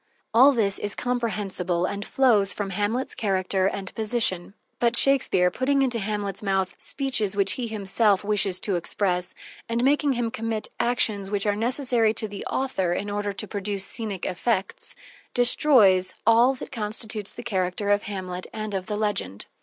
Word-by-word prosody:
All 260 Hz, +5 st, +7 dB
this 210 Hz, -7 st, +1 dB
is 205 Hz, 0 st, -3 dB
comprehensible 205 Hz, -8 st, -2 dB
and 200 Hz, +2 st, -4 dB
flows 215 Hz, -6 st, +2 dB
from 200 Hz, -2 st, -4 dB
Hamlet's 210 Hz, +7 st, -1 dB
character 190 Hz, -2 st, 0 dB
and 195 Hz, -1 st, -4 dB
position. 215 Hz, -5 st, -1 dB, 0.2 s
But 235 Hz, 0 st, +2 dB
Shakespeare, 245 Hz, -10 st, +3 dB
putting 275 Hz, +5 st, +1 dB
into 245 Hz, -3 st, -1 dB
Hamlet's 200 Hz, -2 st, -3 dB
mouth 190 Hz, -2 st, -1 dB
speeches 255 Hz, -8 st, 0 dB
which 195 Hz, -1 st, +3 dB
he 245 Hz, +2 st, -2 dB
himself 205 Hz, -1 st, +1 dB
wishes 200 Hz, -3 st, +1 dB
to 195 Hz, -4 st, 0 dB
express, 180 Hz, +1 st, -1 dB, 0.3 s
and 230 Hz, +1 st, 0 dB
making 285 Hz, +1 st, +2 dB
him 235 Hz, -2 st, -2 dB
commit 225 Hz, -1 st, -3 dB
actions 215 Hz, -5 st, 0 dB
which 205 Hz, 0 st, -1 dB
are 205 Hz, -1 st, +1 dB
necessary 235 Hz, -1 st, +3 dB
to 220 Hz, -, +1 dB
the 200 Hz, -1 st, -7 dB
author 195 Hz, -10 st, -1 dB
in 205 Hz, +3 st, -3 dB
order 205 Hz, 0 st, -2 dB
to 205 Hz, +2 st, -4 dB
produce 200 Hz, -1 st, -2 dB
scenic 210 Hz, -5 st, -3 dB
effects, 190 Hz, +2 st, -2 dB, 0.4 s
destroys 220 Hz, -7 st, +4 dB
all 235 Hz, +4 st, +5 dB
that -, -, -9 dB
constitutes 215 Hz, -2 st, 0 dB
the -, -, -8 dB
character 195 Hz, -2 st, -1 dB
of 205 Hz, 0 st, +1 dB
Hamlet 185 Hz, -2 st, -5 dB
and 215 Hz, -1 st, -5 dB
of 190 Hz, -1 st, -3 dB
the 210 Hz, -1 st, -3 dB
legend. 205 Hz, -, -2 dB
210 Hz, 160 wpm, -24 LUFS, 195-235 Hz, 0.4 s, All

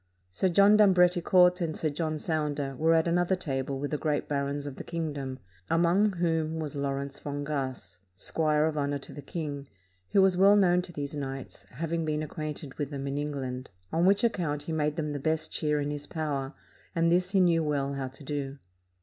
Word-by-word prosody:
Sir 110 Hz, -, +1 dB
John 200 Hz, +4 st, +6 dB
d'Ambreticourt 180 Hz, -2 st, +5 dB
and 160 Hz, -2 st, -2 dB
Sir 155 Hz, -, 0 dB
John 155 Hz, +1 st, -2 dB
Sounder 150 Hz, -4 st, -2 dB
were 165 Hz, +4 st, +3 dB
at 160 Hz, +1 st, +3 dB
another 175 Hz, +2 st, +2 dB
table 135 Hz, -5 st, -3 dB
with 145 Hz, +1 st, -4 dB
the 150 Hz, -, -1 dB
great 150 Hz, -2 st, -1 dB
barons 140 Hz, 0 st, -2 dB
of 140 Hz, -2 st, -6 dB
the -, -, -6 dB
king 165 Hz, -3 st, -3 dB
dom, 135 Hz, -2 st, -5 dB, 0.3 s
among 175 Hz, +5 st, +3 dB
whom 165 Hz, -2 st, 0 dB
was 155 Hz, -2 st, -4 dB
Lawrence 140 Hz, 0 st, -3 dB
Fongasse, 140 Hz, -8 st, -4 dB, 0.2 s
squire 150 Hz, +8 st, +1 dB
of 155 Hz, -1 st, -1 dB
honor 145 Hz, 0 st, 0 dB
to 140 Hz, -, -10 dB
the 145 Hz, -, -8 dB
king, 145 Hz, -2 st, -5 dB, 0.4 s
who 195 Hz, -, +5 dB
was 190 Hz, -1 st, +4 dB
well 195 Hz, +3 st, +6 dB
known 180 Hz, -3 st, +4 dB
to 180 Hz, -, -9 dB
these 145 Hz, -3 st, -5 dB
knights, 135 Hz, -2 st, -6 dB
having 165 Hz, +5 st, -2 dB
been 155 Hz, -1 st, -1 dB
acquainted 150 Hz, -2 st, -5 dB
with 145 Hz, -2 st, -1 dB
them 140 Hz, -2 st, -5 dB
in 140 Hz, +1 st, -2 dB
England; 135 Hz, -3 st, -4 dB, 0.2 s
on 170 Hz, +3 st, +3 dB
which 200 Hz, +3 st, +4 dB
account 170 Hz, -10 st, 0 dB
he 165 Hz, -, -5 dB
made 150 Hz, -1 st, 0 dB
them 155 Hz, -3 st, -2 dB
the 145 Hz, -, -3 dB
best 155 Hz, +3 st, 0 dB
cheer 150 Hz, -1 st, 0 dB
in 145 Hz, 0 st, -2 dB
his 145 Hz, 0 st, -5 dB
power, 145 Hz, -3 st, -3 dB, 0.4 s
and 165 Hz, 0 st, +3 dB
this 180 Hz, +1 st, +2 dB
he 195 Hz, 0 st, +2 dB
knew 170 Hz, -3 st, +4 dB
well 140 Hz, -2 st, -1 dB
how 135 Hz, -1 st, -3 dB
to 135 Hz, +3 st, -11 dB
do. 140 Hz, -1 st, -4 dB
150 Hz, 200 wpm, -29 LUFS, 140-170 Hz, 0.4 s, John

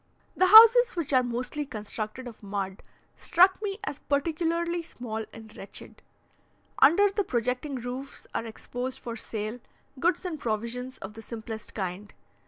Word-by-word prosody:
The 370 Hz, -, +4 dB
houses, 460 Hz, +4 st, +9 dB
which 320 Hz, -5 st, -2 dB
are 255 Hz, -, +6 dB
mostly 250 Hz, +4 st, -3 dB
constructed 215 Hz, 0 st, -5 dB
of 230 Hz, -, -11 dB
mud, 195 Hz, -2 st, -4 dB, 0.4 s
struck 375 Hz, +3 st, +4 dB
me 400 Hz, -2 st, -3 dB
as 290 Hz, -, -4 dB
particularly 335 Hz, +4 st, 0 dB
small 225 Hz, -8 st, -6 dB
and 220 Hz, -1 st, -13 dB
wretched. 195 Hz, -, -8 dB, 0.8 s
Under 365 Hz, +9 st, +6 dB
the 410 Hz, +1 st, 0 dB
projecting 250 Hz, -, -2 dB
roofs 255 Hz, +2 st, -6 dB
are 230 Hz, -, -2 dB
exposed 245 Hz, +3 st, -5 dB
for 235 Hz, -3 st, -6 dB
sale 220 Hz, +1 st, -5 dB, 0.4 s
goods 350 Hz, +4 st, +1 dB
and 330 Hz, -4 st, -4 dB
provisions 235 Hz, +3 st, -3 dB
of 195 Hz, +2 st, -8 dB
the 225 Hz, -, -10 dB
simplest 220 Hz, -1 st, -8 dB
kind. 195 Hz, 0 st, -5 dB
250 Hz, 145 wpm, -28 LUFS, 220-335 Hz, 0.8 s, houses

